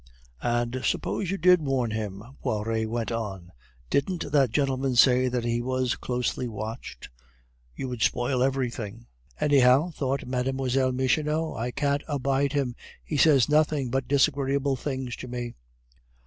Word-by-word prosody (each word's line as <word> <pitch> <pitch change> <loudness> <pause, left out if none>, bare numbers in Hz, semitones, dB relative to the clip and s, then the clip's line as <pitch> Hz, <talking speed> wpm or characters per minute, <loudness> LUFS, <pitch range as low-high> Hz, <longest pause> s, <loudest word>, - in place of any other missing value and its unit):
"And 120 +1 -1
suppose 195 - -1
you 195 - -1
did 180 0 +5
warn 135 -5 0
him," 105 -2 -4 0.2
Poiret 110 +1 -1
went 115 -1 -2
on, 95 -6 -4 0.4
"didn't 165 +1 -1
that 140 -4 +4
gentleman 135 0 0
say 125 +1 +5
that 125 -1 -1
he 120 0 0
was 130 0 0
closely 125 0 -2
watched? 110 - -7 0.7
You 130 - -4
would 125 -3 -5
spoil 125 +3 +1
everything." 120 -4 -2 0.3
"Anyhow," 140 +3 +4
thought 135 -3 -2
Mlle. 125 +1 -1 0.4
Michonneau, 150 +5 0
"I 115 +2 -2
can't 140 +2 0
abide 140 -1 0
him. 135 -4 0 0.3
He 155 - -4
says 140 -3 +5
nothing 150 -4 +2
but 135 0 -1
disagreeable 140 0 +2
things 130 -2 -4
to - - -7
me." 120 -1 -5
130 Hz, 140 wpm, -26 LUFS, 120-140 Hz, 0.7 s, did